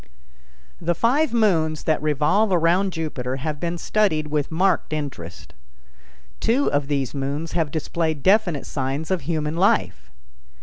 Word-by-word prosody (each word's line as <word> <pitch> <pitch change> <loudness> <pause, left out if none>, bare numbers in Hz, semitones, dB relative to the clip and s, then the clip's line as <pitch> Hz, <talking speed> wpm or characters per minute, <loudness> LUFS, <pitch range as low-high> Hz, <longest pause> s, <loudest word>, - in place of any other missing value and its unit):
The 170 +1 0
five 275 - +2
moons 165 -10 +1
that 155 - +1
revolve 155 +8 +2
around 180 +3 +2
Jupiter 145 -7 -3
have 150 +2 -4
been 170 +1 -2
studied 165 -6 0
with 150 -1 -1
marked 180 0 +1
interest. 135 - -6 0.9
Two 250 +5 +1
of 145 -1 0
these 140 -3 -1
moons 145 +3 -3
have 165 -4 0
displayed 160 0 -2
definite 190 -6 +3
signs 140 +4 -3
of 185 - 0
human 155 +1 -2
life. 95 - +1
160 Hz, 135 wpm, -23 LUFS, 145-185 Hz, 0.9 s, definite